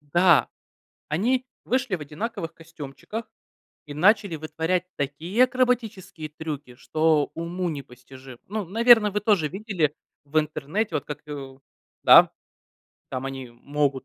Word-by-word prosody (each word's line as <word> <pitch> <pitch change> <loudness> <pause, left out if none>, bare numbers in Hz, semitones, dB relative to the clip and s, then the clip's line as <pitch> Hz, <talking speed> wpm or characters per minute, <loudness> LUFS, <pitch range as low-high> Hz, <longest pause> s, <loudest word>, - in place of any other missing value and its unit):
Да, 170 +2 +4 0.6
они 240 +12 +1 0.2
вышли 255 -4 0
в - - -13
одинаковых 165 +3 -5
костюмчиках 165 +8 -8 0.6
и 145 - -8
начали 200 +2 +3
вытворять 165 +3 -1
такие 160 - +1
акробатические 235 -10 -1
трюки, 150 -4 -7
что 155 +2 +1
уму 175 +2 -3
непостижимо. 130 -2 -10
Ну, 210 -1 -3
наверное, 225 +2 +5
вы 210 +1 -1
тоже 195 -8 +2
видели 185 -6 -1 0.3
в 150 +2 +1
интернете, 155 +7 -2
вот - - -3
как, 150 +1 -8
э. 135 -2 -8 0.4
Да. - - +8 0.8
Там 130 0 -4
они 135 -2 -6
могут 135 +2 -1
160 Hz, 125 wpm, -25 LUFS, 145-210 Hz, 0.8 s, Да